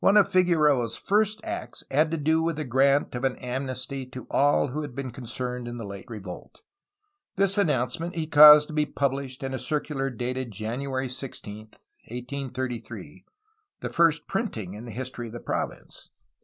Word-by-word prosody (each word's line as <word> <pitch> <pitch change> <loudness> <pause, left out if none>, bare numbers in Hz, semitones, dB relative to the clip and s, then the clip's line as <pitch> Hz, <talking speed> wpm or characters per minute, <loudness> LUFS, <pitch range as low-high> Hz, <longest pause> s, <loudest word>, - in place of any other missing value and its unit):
One 200 - +5
of 205 - +6
Figueroa^s 150 - +3
first 215 +1 +2
acts 340 +1 -6
had 155 +3 +3
to 165 - -1
do 160 +2 +2
with 165 0 0
the 155 - -3
grant 135 +2 +3
of 125 +1 -4
an 130 -1 +1
amnesty 130 +1 -4
to 130 0 -9
all 145 0 +3
who 150 +5 -3
had 145 -5 -7
been 135 -2 -4
concerned 125 0 -5
in 120 0 -5
the 115 - -6
late 100 -1 -8
revolt. 100 - -9 0.7
This 195 0 +3
announcement 165 - 0
he 165 -2 -1
caused 150 -1 +9
to - - -7
be 150 -1 +1
pubhshed 135 -1 -2
in 135 0 -3
a 130 - -2
circular 150 -3 -1
dated 125 +1 -3
January 130 +6 -3
16, 125 -5 -6
1833, 125 +3 -7 0.3
— 430 -2 -49
the - - -3
first 165 -3 +3
printing 115 - -3
in 105 +3 -8
the 120 - -7
history 125 0 -5
of 110 - -10
the 120 - -6
province. - - -5
135 Hz, 175 wpm, -26 LUFS, 125-155 Hz, 0.7 s, caused